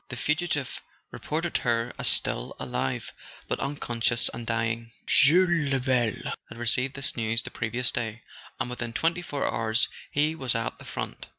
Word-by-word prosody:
The 125 - -4
fugitive 150 -1 0 0.3
reported 165 +2 -1
her 120 0 0
as - - +2
still - - +1
alive, 65 - -2 0.3
but - - -1
unconscious, 120 -4 0
and 115 -1 -6
dying. 115 0 -1
Jules 170 -1 +5
Lebel 125 -4 +1 0.2
had 115 - -10
received 125 +3 0
this 140 -1 +1
news 115 0 +1
the - - -7
previous 120 +1 0
day; 115 -1 -3 0.4
and 120 - -1
within 120 -1 -4
twenty 165 +6 +1
four 145 -5 -2
hours 115 +1 +2 0.2
he 150 +2 +2
was 130 -7 0
at 115 0 -2
the - - -11
front. - - -5
125 Hz, 160 wpm, -27 LUFS, 115-145 Hz, 0.4 s, Jules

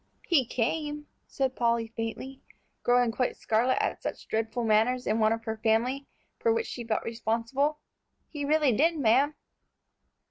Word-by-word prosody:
"He 280 -9 +3
came," 295 +5 -2 0.2
said 265 -1 -1
Polly, 235 -1 0
faintly, 255 +4 -5 0.4
growing 245 -1 +3
quite 250 +2 -1
scarlet 230 +4 +1
at - - -1
such - - -5
dreadful 225 +2 -1
manners 230 +3 +2
in 220 - +1
one 215 0 +4
of 225 0 -2
her 220 -1 -4
family, 240 +5 +1 0.3
for 460 - +2
which 460 0 0
she 240 - -6
felt 225 -1 -1
responsible. 230 +6 -1 0.5
"He 295 -2 -6
really 300 -1 +3
did, 320 +8 +2
ma'am." 275 +3 +3
245 Hz, 150 wpm, -28 LUFS, 225-280 Hz, 0.5 s, one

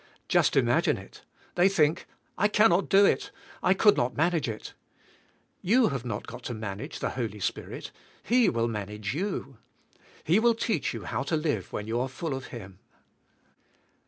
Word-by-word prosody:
Just - - +3
imagine - - +3
it. - - -13 0.3
They 180 +2 +4
think: 155 -5 +1 0.3
I 205 - +3
cannot 210 -3 +3
do 200 +1 +6
it; - - +1 0.3
I 185 - +3
could 205 +1 +5
not 120 +1 0
manage 165 -3 +1
it! 110 - -7 0.9
T'oii 230 +3 +4
have 135 -4 -3
not 115 -3 -4 0.2
to 120 - -3
manage 105 -2 -6
the - - -2
Holy 110 -5 -4
Spirit; - - -4 0.3
He 245 0 +4
will 115 -1 0
manage 105 -1 -4
yo7i. 155 - -3 0.7
He 175 +7 +3
will 235 0 +4
teach 220 - -1
you - - -6
how - - -3
to 140 +4 -1
live 155 -1 -2
when 105 - -4
you 115 +2 -1
are 130 +2 -1
full 150 +3 -4
of 135 -1 -5
Him. 95 -5 -10
140 Hz, 165 wpm, -28 LUFS, 115-195 Hz, 0.9 s, do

